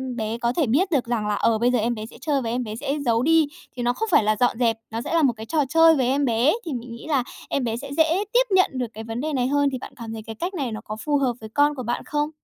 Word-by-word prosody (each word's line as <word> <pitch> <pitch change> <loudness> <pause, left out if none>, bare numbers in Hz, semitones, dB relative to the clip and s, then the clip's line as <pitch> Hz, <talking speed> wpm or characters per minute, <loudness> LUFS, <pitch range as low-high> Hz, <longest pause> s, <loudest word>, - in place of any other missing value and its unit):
bé 225 0 -3
có 235 0 0
thể 310 +2 +1
biết 345 - +2
được 275 -7 +2
rằng 235 -3 -1
là, 210 - +1
ờ, 225 +2 +2
bây 240 +3 +2
giờ 250 - +2
em 235 +2 0
bé 215 0 -6
sẽ 235 - -13
chơi 285 -1 0
và 230 - -3
em 245 +2 -1
bé 215 -2 -6
sẽ 270 +4 -2
giấu 230 -1 +2
đi. 320 0 +4 0.3
Thì 245 - -3
nó 245 +1 +2
không 445 - -3
phải - - +5
là 215 +1 +2
dọn 245 -2 +2
dẹp, 230 -2 +2
nó 225 +1 -3
sẽ 295 - -4
là 330 -2 +3
một 255 - +4
cái 220 - -7
trò 320 - -3
chơi 325 +2 +6
với 260 -4 +1
em 280 +2 +2
bé, 240 +4 +3
thì 315 - -3
mình 240 0 -6
nghĩ 235 - -11
là 275 -6 +1 0.3
em 275 - 0
bé 230 -1 -1
sẽ 280 +3 -7
dễ 325 +5 +3
tiếp - - +5
nhận 370 - +4
được 250 -2 -2
cái 220 - -7
vấn 225 +2 -4
đề 310 +1 -2
này 250 -2 +1
hơn. 285 +1 +2
Thì 260 - -3
bạn - - -9
cảm 230 -2 -7
thấy 220 - -6
cái 225 -1 -7
cách 360 +3 -2
này 275 -9 -2
nó 220 0 -5
có 215 - -5
phù 295 -1 +2
hợp 260 -3 +1
với 220 - -8
con 290 +1 +3
của 255 - -5
bạn 240 +1 -2
không? 295 0 -1
250 Hz, 335 wpm, -23 LUFS, 230-295 Hz, 0.3 s, chơi